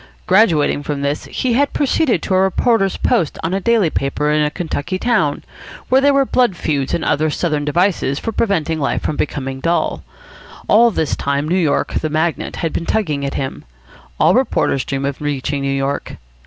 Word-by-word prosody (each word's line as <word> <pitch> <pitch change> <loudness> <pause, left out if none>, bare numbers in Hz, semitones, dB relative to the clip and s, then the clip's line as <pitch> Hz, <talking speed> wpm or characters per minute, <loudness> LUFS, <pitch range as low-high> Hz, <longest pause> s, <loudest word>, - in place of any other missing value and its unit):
Graduating 175 -8 +3
from 145 -1 -4
this, 140 +1 -2
he 255 -2 -1
had 280 +4 +1
proceeded 285 -1 +1
to 195 - -1
a 185 - +4
reporter's 195 +1 +1
post 160 - 0
on 165 - -1
a 195 - -1
daily 220 -6 +2
paper 150 +2 -1
in 150 0 +2
a 150 - +2
Kentucky 160 +2 -3
town, 185 -10 0 0.5
where 260 +1 +4
there 285 +1 +4
were 275 -1 +3
blood 245 -7 +2
feuds 145 -5 -1
and - - -3
other 155 +2 +1
Southern 150 -2 -1
devices 170 -3 +1
for 225 - -3
preventing 165 -8 0
life 140 - -1
from 155 - -1
becoming 135 -3 -3
dull. 170 +5 -1 0.6
All 235 +3 +5
this 160 -8 -1
time 140 +1 -1
New 170 - 0
York, 165 -6 +1
the 155 - -1
magnet, 160 +2 -1
had 165 - -3
been 170 - -3
tugging 155 -10 -1
at 140 - -3
him. 135 -1 -4 0.6
All - - +5
reporters 135 - +1
dream 135 0 -3
of 140 0 -4
reaching 145 -1 -2
New 140 0 -1
York. 135 +1 -2
160 Hz, 190 wpm, -18 LUFS, 145-195 Hz, 0.6 s, All